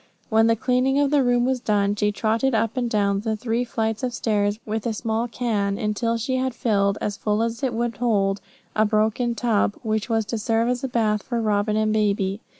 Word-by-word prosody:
When 225 0 +4
the 230 - +4
cleaning 255 +4 +1
of 285 -1 +2
the 290 -2 +4
room 245 -1 +2
was 260 0 0
done, 205 -3 +1
she 210 0 +1
trotted 225 +5 0
up 225 +1 0
and 245 -2 -1
down 200 -2 +1
the 220 +1 -2
three 230 +2 -1
flights 225 -2 -2
of 250 -2 -2
stairs 205 -2 0
with 220 +1 -3
a 230 - -1
small 225 +1 -2
can, 215 -4 -1
until 230 +1 -1
she 255 +3 -1
had 260 -2 -1
filled, 200 -4 +1
as 205 -1 -3
full 210 +1 0
as 230 +2 -3
it 255 -4 -1
would 235 -2 -2
hold, 200 -5 +1 0.3
a 215 - +4
broken 220 +3 +1
tub, 220 -4 +1
which 220 0 -1
was 225 -1 +1
to 220 +2 -3
serve 225 +2 +1
as 250 +1 -1
a - - 0
bath 220 -4 +1
for 240 +1 -3
Robin 210 -1 +1
and 215 0 +1
baby. 200 -1 0
225 Hz, 220 wpm, -23 LUFS, 210-240 Hz, 0.3 s, When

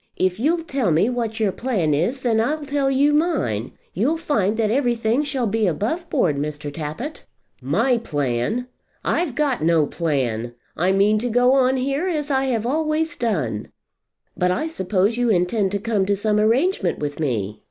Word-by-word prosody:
If 185 +1 0
you'll 330 +7 +1
tell 270 - -1
me 170 +9 +3
what 230 -2 -3
your 210 -3 +2
plan 190 - 0
is, 210 - 0
then 225 -3 +2
I'll 295 +6 -1
tell 280 -1 0
you 280 +2 +3
mine. 290 - 0 0.2
You'll 260 - +1
find 220 - 0
that 215 -2 +1
everything 240 -1 +1
shall 280 -4 -1
be 220 0 +1
above 240 - -2
board, 175 - +1
Mr. 150 0 -4
Tappitt." 165 - -6 0.4
"My 225 - +1
plan? 145 - -2 0.4
I've 330 -8 0
got 280 - 0
no 160 -2 +3
plan. 125 -8 -2 0.2
I 180 +4 +1
mean 205 +2 +3
to 245 +3 -2
go 245 +2 +4
on 265 -1 +3
here 275 +7 -1
as 300 -5 -2
I've 265 -5 0
always 310 +4 0
done." 140 - -2 0.7
"But 180 - +1
I 255 +13 0
suppose 200 - 0
you 245 -1 +1
intend 190 +1 +1
to 200 - 0
come 205 -3 0
to 200 - +2
some 210 +1 +1
arrangement 230 - +2
with 145 0 -4
me. 110 -9 -2
225 Hz, 175 wpm, -22 LUFS, 175-270 Hz, 0.7 s, go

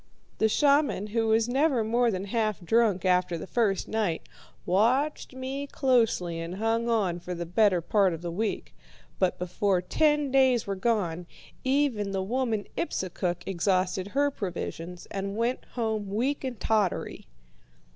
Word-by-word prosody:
The 220 - +3
shaman, 280 -5 +2
who 225 -1 +1
was 220 +1 +3
never 265 -1 +2
more 235 +2 +2
than 190 -3 -2
half 215 0 -1
drunk 215 -3 +2
after 180 -1 +2
the - - -6
first 200 -2 0
night, 210 -7 -1 0.4
watched 255 +10 +1
me 265 +2 -4
closely 225 - +1
and 165 +2 -5
hung 225 +3 0
on 195 -7 +1
for 180 +1 -6
the 170 0 -4
better 185 0 +3
part 195 +2 +2
of 165 0 -6
the 170 - -3
week. 210 +5 -3 0.5
But 185 -2 +1
before 180 +2 0
ten 295 - +1
days 260 -3 +4
were 200 - -2
gone, 185 -5 -1 0.4
even 260 -7 +1
the 190 -1 -1
woman 225 -1 -1
Ipsukuk 180 - -2
exhausted 185 0 0
her 285 +6 +1
provisions, 180 -5 -5
and 195 +1 -4
went 235 +3 -1
home 220 -4 -1
weak 255 +9 -1
and 255 -4 -4
tottery. 210 -2 -1
215 Hz, 150 wpm, -27 LUFS, 185-245 Hz, 0.5 s, days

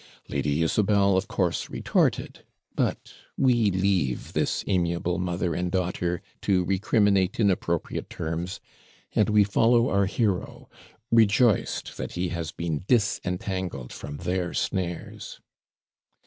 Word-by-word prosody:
Lady 70 +3 0
Isabel 100 +2 +3
of 95 +1 0
course 90 -3 -1
retorted. - - 0 0.3
But - - -2 0.2
we 120 -5 +3
leave 95 -9 0
this - - 0
amiable 85 -1 0
mother 90 -1 -1
and 90 +2 -2
daughter 90 -1 -1 0.2
to 90 -2 +2
recriminate 100 0 +2
in 100 -3 +4
appropriate 85 -2 -2
terms, 85 +4 -4 0.5
and 110 - +3
we 105 -1 +5
follow 115 +4 +3
our 100 -1 +2
hero, 100 -3 -2 0.4
rejoiced 115 0 +3
that - - -5
he 90 0 -1
has 85 -2 -4
been 85 -3 -3
disentangled 95 - -1
from 75 0 -7
their 90 +2 -2
snares. 90 -2 -3
90 Hz, 120 wpm, -26 LUFS, 85-100 Hz, 0.5 s, we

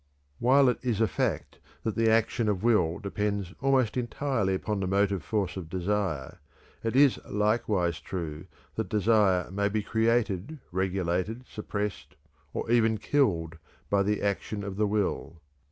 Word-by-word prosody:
While 135 +3 +5
it 125 - +2
is 120 -5 -1
a 110 - +4
fact - - -2 0.2
that 110 - -1
the 115 0 +3
action 110 0 +2
of 100 -2 -1
will 90 -8 +3
depends 100 -1 -2
almost 130 -4 +2
entirely 120 -5 0
upon 105 +2 -2
the 95 - -1
motive 100 -1 +1
force 100 -5 -1
of 85 -4 -6
desire, 90 -6 -2 0.4
it 115 +1 -1
is 140 -1 +5
likewise 105 -5 0
true 85 -2 -5 0.3
that - - -3
desire 105 -4 +3
may 100 +1 0
be 105 0 -1
created, 115 - 0
regulated, 95 +4 -1
suppressed, 105 -1 -4 0.4
and - - -4
even 115 -2 +4
killed 90 - 0 0.3
by 100 -1 +4
the 105 +1 0
action 100 +1 -2
of 100 -1 -5
the 105 +1 +1
will. 100 -5 -1
105 Hz, 150 wpm, -28 LUFS, 95-115 Hz, 0.4 s, While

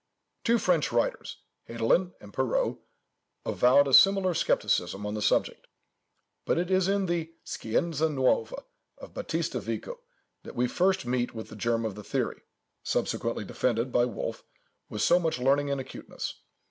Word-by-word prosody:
Two 235 0 +3
French 180 -7 +1
writers—Hedelin 120 +6 -1
and - - -14
Perrault—avowed 140 - 0
a 135 - -2
similar 195 0 +6
scepticism 95 - 0
on 105 - -3
the 105 - -3
subject; - - 0 0.8
but - - 0
it 175 +2 -1
is 185 -1 +3
in 200 0 +1
the 170 -2 -2
"Scienza 160 +7 -1
Nuova" 150 - 0 0.3
of - - -12
Battista - - -2
Vico, - - -5 0.4
that - - -11
we 125 +1 +1
first 185 +3 +1
meet 120 -1 -1
with 110 - -7
the - - -10
germ 115 +1 0
of 110 - -2
the 105 +1 -9
theory, - - -2 0.4
subsequently - - -2
defended 120 0 -1
by 120 0 +3
Wolf 120 -4 -5 0.5
with 105 -1 -2
so 175 +12 +5
much 165 -5 -1
learning 140 +3 +2
and 140 -1 -1
acuteness. 130 - -6
140 Hz, 145 wpm, -28 LUFS, 115-180 Hz, 0.8 s, similar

